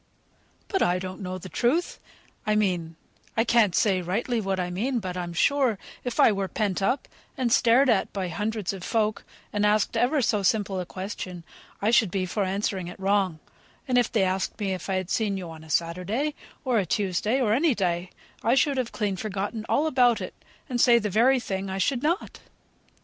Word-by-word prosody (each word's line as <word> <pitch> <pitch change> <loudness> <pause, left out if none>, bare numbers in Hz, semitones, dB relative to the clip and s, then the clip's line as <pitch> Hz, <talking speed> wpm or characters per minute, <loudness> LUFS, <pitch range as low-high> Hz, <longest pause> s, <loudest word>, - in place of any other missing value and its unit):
"But 385 - -1
I 175 +1 +3
don't 185 +1 -6
know 185 -1 -4
the 185 - -9
truth; 260 - 0 0.5
I 215 - +3
mean 180 -6 0 0.4
I 225 - +4
can't 230 -6 +3
say 190 -4 +3
rightly 225 +6 -1
what 195 -2 -1
I 180 0 -2
mean; 240 +8 -1
but 185 -5 -4
I'm 175 -1 -4
sure, 255 +5 +2 0.3
if 245 -2 -4
I - - +7
were 195 -1 -1
pent 200 -1 -1
up, 250 +8 0 0.3
and 240 -3 +1
stared 245 +4 +5
at 225 -6 +2
by 190 -2 -3
hundreds 210 +2 -2
of 190 -2 -8
folk, 215 -1 0 0.3
and 205 0 0
asked 210 0 +2
ever 285 +5 +2
so 215 -2 +1
simple 195 -1 +1
a 180 - -4
question, 185 -2 -6 0.4
I 215 - +3
should 230 -4 +4
be 185 +1 -1
for 200 +3 -1
answering 190 -1 -2
it 175 - -9
wrong; 195 -3 +1 0.5
if 245 -3 +2
they 215 -4 +2
asked 190 +2 -1
me 195 -2 -1
if 185 - -6
I 190 - +1
had 185 -1 -3
seen 205 -3 0
you 175 -3 -6
on 160 -1 -11
a 160 - -14
Saturday, 180 - -1 0.3
or 250 -4 +2
a 195 - 0
Tuesday, 205 +7 0
or 220 -5 +2
any 285 +2 +3
day, 180 -2 -1 0.3
I 235 +3 +3
should 280 0 +2
have 250 -2 -1
clean 205 -4 -1
forgotten 210 +3 -4
all 295 - +2
about 250 -6 +3
it, - - -6 0.3
and 245 -4 0
say 240 -1 +6
the 210 -3 -1
very 250 +6 +4
thing 195 -4 -4
I 190 - -3
should 245 +6 +1
not." 335 +6 -1
205 Hz, 205 wpm, -26 LUFS, 185-235 Hz, 0.5 s, I